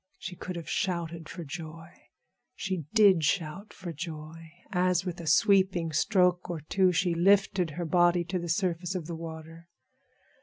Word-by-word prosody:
She 180 0 -7
could 180 +1 -6
have 170 -2 -7
shouted 170 -3 -2
for 175 - -7
joy. 160 +1 -8 0.7
She 185 -5 -3
did 200 -7 +5
shout 175 +5 -1
for 175 -3 -7
joy, 160 0 -8 0.2
as 180 -1 +1
with 175 -1 -4
a 165 - -8
sweeping 185 -1 +3
stroke 180 +2 +2
or 170 -2 -3
two 185 +5 +2
she 180 0 +1
lifted 190 0 +3
her 175 - -2
body 175 +1 +3
to 180 +2 -3
the 170 0 -5
surface 180 +1 -1
of 175 -4 -3
the 170 +1 -5
water. 165 0 -9
175 Hz, 160 wpm, -29 LUFS, 165-185 Hz, 0.7 s, did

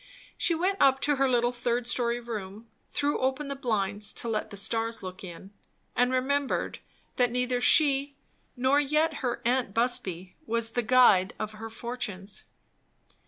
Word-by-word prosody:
She 340 - +1
went 375 +4 -1
up 270 -1 +5
to 290 -1 +2
her 270 0 +2
little 240 -1 +2
third 240 0 -2
story 240 -1 0
room, 220 -2 -7 0.2
threw 290 +1 -1
open 265 +2 -1
the 280 - -3
blinds, 210 -5 -2
to - - -2
let 220 -2 -2
the 200 - -8
stars 225 +2 -2
look 185 +1 -8
in, 185 +2 -10 0.4
and 245 +1 +2
remembered 270 +2 -1 0.4
that 245 -1 +3
neither 250 0 -1
she 280 +1 +4 0.4
nor 260 +3 +3
yet 300 +2 +1
her 245 -3 -3
aunt 245 -4 0
Busby 190 -7 +2
was 230 0 -1
the 245 - 0
guide 225 -6 +4
of 215 -1 -4
her 220 +1 -8
fortunes. 220 -4 -6
245 Hz, 160 wpm, -28 LUFS, 215-265 Hz, 0.4 s, up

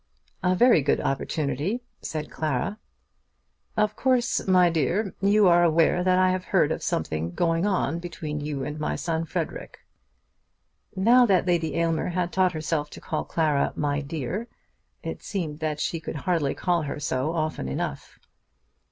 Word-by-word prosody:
"A 180 -1 +2
very 235 -5 +5
good - - +1
opportunity," 150 - -2 0.2
said 155 -1 -5
Clara. 155 - -2 1.0
"Of 210 0 +2
course, 250 -3 +1
my 180 -1 +5
dear, 170 - 0
you 200 0 +5
are 175 0 +5
aware 170 +1 +3
that 185 0 +3
I 185 0 +4
have 185 0 -2
heard 165 -6 +2
of - - -2
something 85 - -2
going 165 +2 +1
on 180 -4 0
between 155 -3 -5
you 145 -2 -3
and 150 +2 -5
my 150 - -1
son 165 -1 -2
Frederic." - - -5 1.1
Now 240 +6 +5
that 185 -4 +3
Lady 165 -4 0
Aylmer 165 -1 0
had 175 0 -2
taught 185 -1 +3
herself 155 -1 -2
to - - -10
call 155 - -3
Clara 150 -4 +1
"my 145 0 0
dear," 160 - -4 0.6
it - - -5
seemed 160 -7 -4
that 155 -2 -2
she 165 - -1
could 160 - -6
hardly 155 -3 0
call 175 -2 +1
her 145 -1 -4
so 150 +2 -1
often 155 - -2
enough. 65 - -4
165 Hz, 160 wpm, -25 LUFS, 150-185 Hz, 1.1 s, very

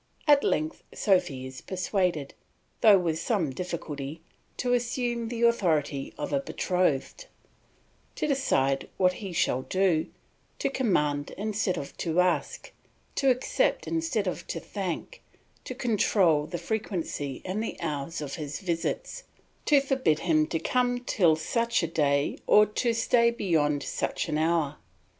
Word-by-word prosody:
At 290 -2 +5
length 155 +1 0
Sophy 180 -10 +1
is 130 0 -9
persuaded, 180 -5 -1 0.5
though 210 -3 +7
with 165 -3 -1
some 185 - 0
difficulty, 155 -2 -5 0.4
to 245 0 0
assume 240 -1 -1
the 235 0 -3
authority 160 -12 +1
of - - -4
a 280 - +3
betrothed, 185 - -1 0.9
to - - -1
decide 140 - +1
what 185 -1 +3
he 195 -3 -5
shall 130 -6 +1
do, 185 0 +1 0.5
to - - -1
command 150 - 0
instead 205 -2 -1
of 140 - -6
to 165 0 0
ask, 180 0 0 0.4
to 270 - +2
accept 255 - +1
instead 325 -11 -1
of 180 - -4
to 165 - -3
thank, 195 - -5 0.4
to 255 - -5
control 195 - +2
the 175 - -4
frequency 170 - -3
and 190 +4 -2
the - - -5
hours 155 0 -3
of 140 -2 -5
his 150 -2 -5
visits, 180 - -3 0.4
to 290 -2 +6
forbid 265 - +1
him 155 -3 +2
to 165 - -1
come 245 +7 0
till 175 -9 +3
such 230 +7 0
a - - +1
day 145 -3 +1
or 210 - +7
to 230 +3 -1
stay 235 +1 +3
beyond 160 -10 +1
such - - -2
an 155 0 0
hour. 160 -3 +1
180 Hz, 145 wpm, -27 LUFS, 155-235 Hz, 0.9 s, though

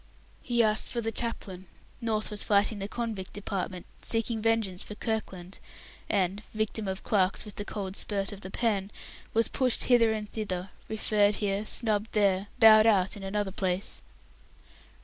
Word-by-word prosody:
He 240 -2 +2
asked 215 0 +3
for 240 - -2
the 225 -1 -1
chaplain. 195 -6 -3 0.3
North 220 -2 0
was 210 - +1
fighting 205 +1 +2
the 195 - -3
Convict 220 -4 -4
Department, 190 -3 -4 0.2
seeking 225 -1 0
vengeance 220 -5 +1
for 210 - -4
Kirkland, 195 -5 -4 0.5
and 195 0 +1
(victim 215 -1 -2
of 190 0 -4
"clerks 195 -1 +1
with 210 - -10
the 205 - -6
cold 195 -3 -5
spurt 200 -1 -1
of 205 -1 -9
the 190 - -6
pen") 200 -2 0 0.5
was 230 0 +4
pushed 255 -3 +1
hither 235 -3 +5
and 215 -1 -3
thither, 190 -4 -4 0.2
referred 210 -1 +2
here, 205 0 -1
snubbed 220 -2 -1
there, 200 -2 +2
bowed 220 -2 +8
out 195 -4 +3
in 205 - -9
another 195 0 -2
place. 185 0 -1
210 Hz, 160 wpm, -29 LUFS, 195-220 Hz, 0.5 s, bowed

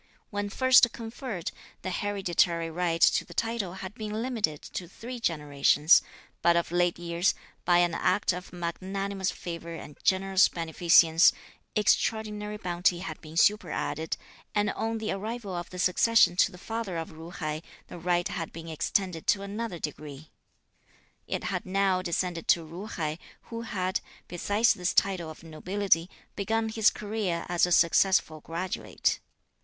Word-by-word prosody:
When 205 0 -2
first 255 +1 +5
conferred, 225 - -5 0.3
the 185 - -3
hereditary 175 -4 0
right 170 0 -1
to - - +5
the - - -13
title 225 -6 -1
had 190 - -7
been 215 0 -4
limited 225 - -1
to 180 -5 -6
three 240 +7 -8
generations; 150 -3 +4 0.4
but 170 0 +4
of 170 -1 0
late 175 0 +2
years, 170 +1 0 0.3
by 175 -1 +5
an 175 -1 +3
act 195 +2 +1
of 180 +1 -7
magnanimous 190 +3 -3
favour 170 -1 -6
and 150 -3 -10
generous 190 0 +4
beneficence, 165 0 +5 0.4
extraordinary 210 0 +1
bounty 175 -2 +1
had 160 -5 -6
been 155 0 -10
superadded; 165 -5 +1 0.4
and 210 0 +2
on 225 0 -2
the 220 -1 -3
arrival 210 0 -4
of 175 0 -4
the 180 - -9
succession 185 +2 +4
to 195 - +4
the 180 - -12
father 225 -2 -4
of 165 - -4
Ju 160 +1 -10
hai, 155 -3 -4 0.2
the - - -10
right 175 0 +1
had 165 -3 -4
been 165 0 -9
extended 165 +2 -1
to 200 - +3
another 205 -1 -4
degree. 150 -1 -7 1.0
It - - -3
had - - -2
now 190 -1 +1
descended 175 -1 -2
to 165 -2 +3
Ju 180 +6 -7
hai, 155 -6 -3 0.3
who 230 0 -4
had, 190 -4 -2 0.3
besides 205 +6 +2
this 180 0 -2
title 185 -5 +2
of 160 - -11
nobility, 170 +2 0 0.3
begun 220 +2 0
his 220 -1 +4
career 205 -5 -3
as 175 0 +3
a - - -4
successful 170 -1 +4
graduate. 175 +4 -2
180 Hz, 150 wpm, -28 LUFS, 170-205 Hz, 1.0 s, first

